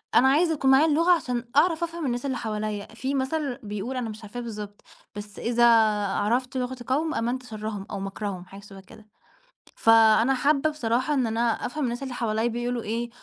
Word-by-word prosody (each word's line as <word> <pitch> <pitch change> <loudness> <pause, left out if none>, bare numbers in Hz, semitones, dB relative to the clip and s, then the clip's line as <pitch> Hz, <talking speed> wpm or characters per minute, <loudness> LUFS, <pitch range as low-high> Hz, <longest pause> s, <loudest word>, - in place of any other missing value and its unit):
أنا 260 - +6
عايزة 320 +5 +3
يكون 270 -3 +2
معايا 270 +4 +6
اللغة 325 +3 +3
عشان 250 -8 0
أعرف 330 +2 +3
أفهَم 335 -1 -4
الناس 245 0 -2
اللي 265 -3 -1
حواليّا، 215 -2 -3
في 260 +4 -3
مثل 270 -1 -1
بيقول 210 +5 -4
أنا 240 -3 -3
مش 215 +1 -9
عارفاه 210 +4 -7
بالضبط، 210 -3 -7 0.3
بس 205 -1 -8
إذا 240 0 +2 0.4
عرفت 240 +7 -1
لغة 255 0 -3
قوم 310 +5 0
آمنت 245 +3 -2
شرّهم 215 -3 -6
أو 200 - -4
مكرهم 195 -1 -5
حاجة 195 +2 -12
شبَه 195 -1 -13
كده، 215 +2 -17 0.7
فأنا 225 +2 +5
حابّة 285 +3 +2
بصراحة 255 -1 -1
إن 260 -5 +1
أنا 225 +1 -1 0.2
أفهَم 300 +4 -3
الناس 245 +1 -2
اللي 265 -2 -5
حواليّا 225 -1 -1
بيقولوا 240 0 -2
إيه، 235 +2 -3
240 Hz, 185 wpm, -25 LUFS, 215-270 Hz, 0.7 s, أنا